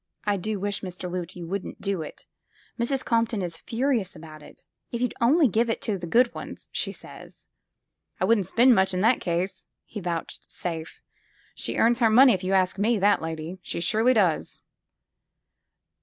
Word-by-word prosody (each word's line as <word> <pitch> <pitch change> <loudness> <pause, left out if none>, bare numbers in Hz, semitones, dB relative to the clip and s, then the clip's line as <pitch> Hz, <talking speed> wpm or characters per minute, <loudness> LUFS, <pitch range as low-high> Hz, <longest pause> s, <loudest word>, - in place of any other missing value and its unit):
"I 205 -1 +2
do 205 +2 -3
wish, 205 +1 -2
Mr. 185 -1 -6
Loote, 180 0 -5
you 175 -2 -7
wouldn't 195 +3 -5
do 195 -4 -2
it. 155 - -9 0.5
Mrs. 260 +3 -1
Compton 230 -3 +1
is 170 -2 -4
furious 230 -5 -1
about 155 -1 -11
it. - - -15 0.3
If 235 - -3
you'd 250 0 0
only 285 +6 +5
give 230 +2 +1
them 225 - +1
to 205 -3 -2
the 170 - -6
good 240 +6 +3
ones, - - -9
she - - -2
says. - - -13 0.2
' - - -57
' - - -46
I - - +2
wouldn't 210 -6 +2
spend 245 +2 +5
much 190 -3 +2
in 180 - 0
that 230 +4 +3
case," 180 +2 -2 0.2
he 215 - -7
vouch 170 -3 -4
safed. 165 -2 -6 0.5
She - - -3
earns 235 +1 +3
her 230 -3 +4
money, 250 +3 +7
if 185 - -3
you 185 +1 0
ask 190 0 +2
me, 225 +3 +2
that 205 +1 +3
lady. 160 +3 -5
She - - -4
surely 220 +8 +2
does 185 -7 +1
200 Hz, 190 wpm, -26 LUFS, 180-230 Hz, 0.5 s, money